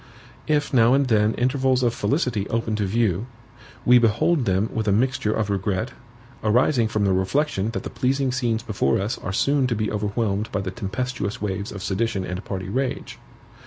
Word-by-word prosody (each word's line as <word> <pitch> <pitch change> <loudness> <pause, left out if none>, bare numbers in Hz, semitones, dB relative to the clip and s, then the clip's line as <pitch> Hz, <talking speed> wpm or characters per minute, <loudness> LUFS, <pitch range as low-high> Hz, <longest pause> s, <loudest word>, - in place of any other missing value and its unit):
If 150 -2 +1
now 120 0 +5
and 140 0 +3
then 110 -2 +2
intervals 130 0 +1
of 120 -1 +2
felicity 125 - -1
open 115 -1 -1
to 105 -2 0
view, 110 0 0 0.6
we 125 0 +7
behold 120 +6 +2
them 95 +2 +1
with 110 -1 -2
a - - +4
mixture 130 +1 +1
of 105 -2 -1
regret, 100 +3 -1 0.5
arising 120 +2 +3
from 105 -1 0
the 95 - +2
reflection 95 +3 0
that - - -3
the - - -6
pleasing 135 +1 0
scenes 120 -3 -1
before 95 - 0
us 105 +5 -2
are 95 - -4
soon 140 +6 +2
to 120 - -1
be 110 0 -1
overwhelmed 105 0 -1
by 100 - -1
the 95 -1 -4
tempestuous 110 +1 -3
waves 100 -1 -3
of 100 -1 -7
sedition 100 -1 -1
and 90 +2 -5
party 95 -5 -5
rage. 130 +6 -3
110 Hz, 185 wpm, -23 LUFS, 100-125 Hz, 0.6 s, we